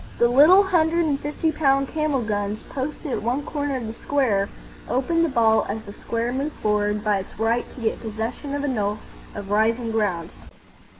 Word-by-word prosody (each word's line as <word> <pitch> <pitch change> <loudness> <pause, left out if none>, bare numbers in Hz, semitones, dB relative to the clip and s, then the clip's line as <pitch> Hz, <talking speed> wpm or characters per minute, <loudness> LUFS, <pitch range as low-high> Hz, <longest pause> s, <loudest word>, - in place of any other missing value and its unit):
The 235 - +4
little 305 +11 +7
hundred 340 -3 +2
and 285 -3 0
fifty 300 +2 -1
pound 275 -3 +2
camel 305 -5 0
guns 205 -1 -2
posted 285 +2 -4
at - - -1
one 250 +6 -1
corner 290 -2 -2
of 240 - -5
the 220 - -5
square 230 -7 0 0.4
opened 330 +7 +1
the 330 - +2
ball 225 -4 +3
as 220 +2 -3
the 200 -2 -10
square 230 +3 -3
moved 280 +4 -2
forward 210 0 0
by 210 -2 +2
its 190 - -10
right 230 +2 +1
to 255 - -9
get 220 - -1
possession 230 +6 -4
of 285 - -2
a - - 0
knoll 210 -5 -1 0.4
of 200 -1 -6
rising 225 +2 +1
ground. 190 -7 -1
240 Hz, 190 wpm, -23 LUFS, 215-285 Hz, 0.4 s, little